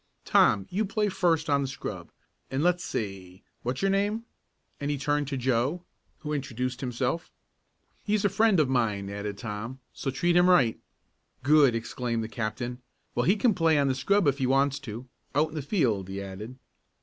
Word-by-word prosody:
"Tom, 100 -2 +4
you 205 +4 +1
play 210 0 0
first 165 -4 +1
on 140 -2 +3
the 135 - -1
scrub. 135 - -6 0.4
And 135 +3 -1
let's 180 0 +2
see 95 -3 -5 0.2
what's 125 +7 -3
your 195 - +3
name?" 205 +3 0 0.5
and 145 - -2
he 145 - 0
turned 145 +1 0
to 140 -1 -2
Joe, 130 +7 0 0.4
who 150 -1 -3
introduced 130 -2 -3
himself. 130 +5 -2 0.7
"He's 210 0 +1
a - - +7
friend 200 -1 +3
of 150 - +4
mine," 105 -6 0
added 100 0 -4
Tom, 115 +4 -5
"so 135 - -3
treat 170 +6 +1
him 175 +1 +6
right." 130 -11 +4 0.6
"Good!" 140 -3 +5
exclaimed 115 0 -2
the 110 - -5
captain. 120 +2 -4 0.3
"Well, 120 - 0
he 190 - +5
can 220 +1 +3
play 165 -3 +3
on 140 -1 +3
the - - +2
scrub 200 +9 +2
if 140 0 +2
he 130 - +1
wants 135 +1 +2
to. 125 -2 -8 0.3
Out 155 +2 +3
in - - -13
the 155 - -3
field," 120 - 0
he 95 +1 -4
added. 100 +6 -7
135 Hz, 185 wpm, -28 LUFS, 115-165 Hz, 0.7 s, a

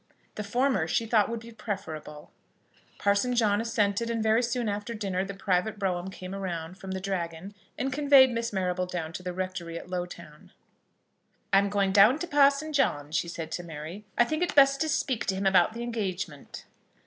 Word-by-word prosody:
The 210 - -5
former 225 -5 +1
she 225 +7 0
thought 220 -2 +3
would 230 -1 -4
be 230 0 -11
preferable. 160 -9 -6 0.7
Parson 205 +5 +1
John 215 -3 +3
assented, 225 -1 0
and 230 -1 -1
very 220 +2 +3
soon 240 -1 -1
after 210 +3 -3
dinner 195 -3 -2
the 195 0 -6
private 195 +2 0
brougham 185 -2 -2
came 185 0 -8
round 180 -2 -5
from 190 - -8
the 190 0 -3
Dragon, 185 -1 -4 0.2
and 265 0 -2
conveyed 280 -2 +6
Miss 230 0 -2
Marrable 185 -2 -1
down 165 -3 -4
to 180 - -6
the 180 0 -4
rectory 180 -2 -4
at 180 - -10
Lowtown. 175 -4 -7 1.0
"I 195 - +8
am 200 0 0
going 200 -1 +1
down 210 +7 +6
to 350 - -3
Parson 285 0 +3
John," 150 - 0
said 165 -1 -3
she - - -1
to 175 - -8
Mary. 165 +4 -8
"I - - +7
think 310 +6 -2
it 355 - 0
best 275 0 +6
to 315 - +1
speak 260 -4 -1
to 190 - +1
him 195 +1 -3
about 190 +1 +4
the 235 +1 -5
engagement." 205 -6 -5
200 Hz, 195 wpm, -28 LUFS, 180-235 Hz, 1.0 s, I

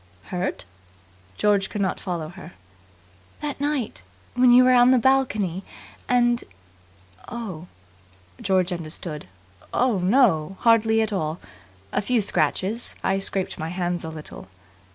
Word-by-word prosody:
"Hurt?" 180 - -3 0.7
George 200 -2 +2
could 210 - -5
not 190 -2 0
follow 170 -4 -4
her. 180 - -11 0.9
"That 290 -2 -4
night. 285 - -2 0.3
When 250 0 +4
you 245 +1 +8
were 255 0 +5
on 245 0 +6
the 260 - +6
balcony, 220 -8 +1 0.5
and 240 -1 +3 0.4
" 90 0 -30
"Oh!" 195 -8 -6 0.7
George 185 -1 +1
understood. 155 - -5 0.4
"Oh, 245 -5 +2
no, 190 - +3
hardly 225 -1 +4
at 215 -1 -2
all. 160 -3 -2 0.5
A - - 0
few 240 +3 +1
scratches. 210 +2 -1
I 195 0 +1
scraped 195 -1 -2
my 160 - -3
hands 175 -1 -2
a 160 - -5
little." 155 -9 -9
195 Hz, 135 wpm, -24 LUFS, 175-240 Hz, 0.9 s, you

